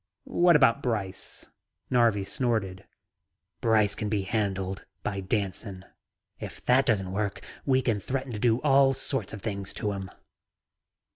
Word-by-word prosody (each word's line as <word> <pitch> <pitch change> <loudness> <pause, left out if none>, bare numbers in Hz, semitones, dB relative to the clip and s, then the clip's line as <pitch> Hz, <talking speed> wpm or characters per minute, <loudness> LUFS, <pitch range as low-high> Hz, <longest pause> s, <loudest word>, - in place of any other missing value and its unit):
"What 175 -1 +4
about 140 -2 +5
Brice," 105 -7 -4 0.4
Narvi 115 -5 +3
snorted. 100 -3 -1 0.8
"Brice 110 -4 +3
can 105 - -3
be 105 -2 0
handled 95 -3 -2 0.2
by 100 - -2
Danson. 95 -1 -3 0.5
If - - -8
that 130 +2 +4
doesn't 95 -6 +1
work, 100 0 -2 0.3
we 130 -1 +3
can 115 -4 +1
threaten 130 +5 -3
to 105 - -4
do 115 +1 +3
all 135 -2 +5
sorts 135 +1 -3
of 110 -3 -8
things 100 -3 -3
to 105 - -1
him." 95 -1 -5
110 Hz, 140 wpm, -28 LUFS, 100-125 Hz, 0.8 s, about